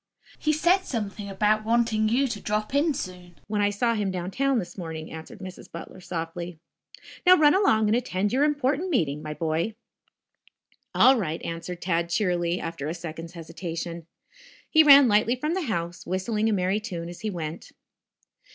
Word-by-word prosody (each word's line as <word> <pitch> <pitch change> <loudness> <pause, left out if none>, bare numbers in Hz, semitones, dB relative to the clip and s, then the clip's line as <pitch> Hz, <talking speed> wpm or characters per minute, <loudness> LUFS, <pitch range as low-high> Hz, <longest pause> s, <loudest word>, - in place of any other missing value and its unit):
"He 305 - +1
said 345 +5 +3
something 210 - -5
about 210 +2 +1
wanting 225 -1 +2
you 265 +5 +2
to 210 -3 -5
drop 210 +3 -2
in 295 +3 +3
soon, 180 -4 -7
when 210 0 -1
I 205 - +3
saw 230 +4 +1
him 210 -3 -1
downtown 195 +10 0
this 180 - -4
morning," 160 -3 -6
answered 160 +3 -9
Mrs. 185 -1 -9
Butler 170 +2 -9
softly. 170 0 -5 0.7
"Now, 365 0 +7
run 295 -1 +6
along 295 - +3
and 215 - +3
attend 205 -4 -1
your 270 +3 +3
important 295 +3 +1
meeting, 150 - 0
my 155 0 -6
boy." 165 +6 -1 1.2
"All 265 +1 +6
right," 165 -5 -2
answered 170 +1 -5
Tad 170 -2 0
cheerily, 175 -2 0
after 165 -4 -5
a 160 - -3
second's 165 0 -7
hesitation. 170 0 -6 0.6
He 315 - +7
ran 280 -3 +9
lightly 220 +3 +3
from 300 +6 -2
the 380 - -1
house, 170 -2 -3
whistling 210 +4 0
a - - +1
merry 190 0 +1
tune 170 -5 -5
as 175 0 -9
he 215 - -2
went. 165 -4 -6
195 Hz, 170 wpm, -26 LUFS, 170-235 Hz, 1.2 s, ran